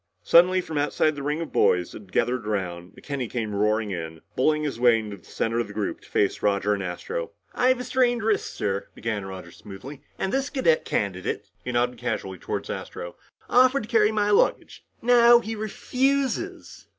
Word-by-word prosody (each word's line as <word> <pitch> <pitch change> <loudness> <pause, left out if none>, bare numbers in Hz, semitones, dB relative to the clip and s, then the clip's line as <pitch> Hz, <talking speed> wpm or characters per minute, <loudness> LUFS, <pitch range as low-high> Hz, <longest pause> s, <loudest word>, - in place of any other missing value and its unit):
Suddenly 185 +2 +5
from 160 -4 -3
outside 150 +1 +1
the 145 - -7
ring 150 +3 -1
of 165 - -5
boys 90 -1 +3
that - - -9
had 95 -3 -18
gathered 125 0 0
around, 90 -4 -3
McKenny 135 -5 -5
came 110 -4 -3
roaring 105 +1 +1
in, 80 -3 -6
bulling 150 +3 +2
his 140 -6 -3
way 120 -2 +5
to 105 -2 -7
the 90 - -23
center 115 +1 -2
of 120 - -1
the - - -10
group 105 -2 -3
to - - -18
face 100 - +1
Roger 100 0 +2
and 100 - -2
Astro. 470 - -4 0.2
"I 250 - +2
have 255 -1 +3
a - - -3
strained 245 -2 +1
wrist, 215 -2 0
sir," 100 0 -2
began 105 -3 -3
Roger 95 -3 -8
smoothly. 120 - -10 0.2
"And 190 - -2
this 270 +1 0
cadet 210 - +2
candidate" 95 -3 -2
he 125 - -3
nodded 120 +1 0
casually 95 -6 -3
toward - - -4
Astro 85 0 -6 0.3
"offered 255 +1 +4
to 215 - -10
carry 215 -2 +4
my 210 -1 +1
luggage. 205 - +1 0.2
Now 240 0 +7
he 225 -1 -3
refuses." 260 +5 -2
125 Hz, 195 wpm, -25 LUFS, -, 0.3 s, Now